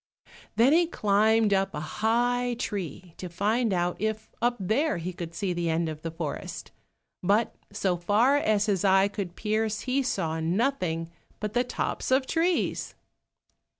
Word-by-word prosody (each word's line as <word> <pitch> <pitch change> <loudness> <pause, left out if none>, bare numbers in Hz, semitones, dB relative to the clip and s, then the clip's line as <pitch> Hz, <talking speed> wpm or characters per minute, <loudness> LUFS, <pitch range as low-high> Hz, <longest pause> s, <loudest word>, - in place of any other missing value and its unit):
Then 250 +6 +5
he 340 +1 +4
climbed 215 -4 +3
up 195 0 +1
a - - -2 0.2
high 245 +2 +2
tree 185 - -5
to 180 - -6
find 215 +6 +1
out 175 -1 0
if 220 0 -2
up 240 +1 +2
there 235 - +1
he 175 +2 -4
could 170 -1 -7
see 190 0 -1
the 170 -1 -1
end 165 +1 +1
of 155 -1 -6
the 165 - -4
forest, 160 -2 -6 0.5
but 205 +5 +2 0.2
so 195 -3 0
far 210 +10 +3
as 215 -6 +2
his 200 -4 0
eye 195 0 +5
could 200 -4 -5
pierce 215 0 -1
he 265 +1 0
saw 160 -11 -1
nothing 170 -3 0 0.3
but 210 0 -3
the 245 +1 +2
tops 250 - -3
of 260 +1 +3
trees. 335 +4 0
205 Hz, 160 wpm, -27 LUFS, 175-240 Hz, 0.5 s, Then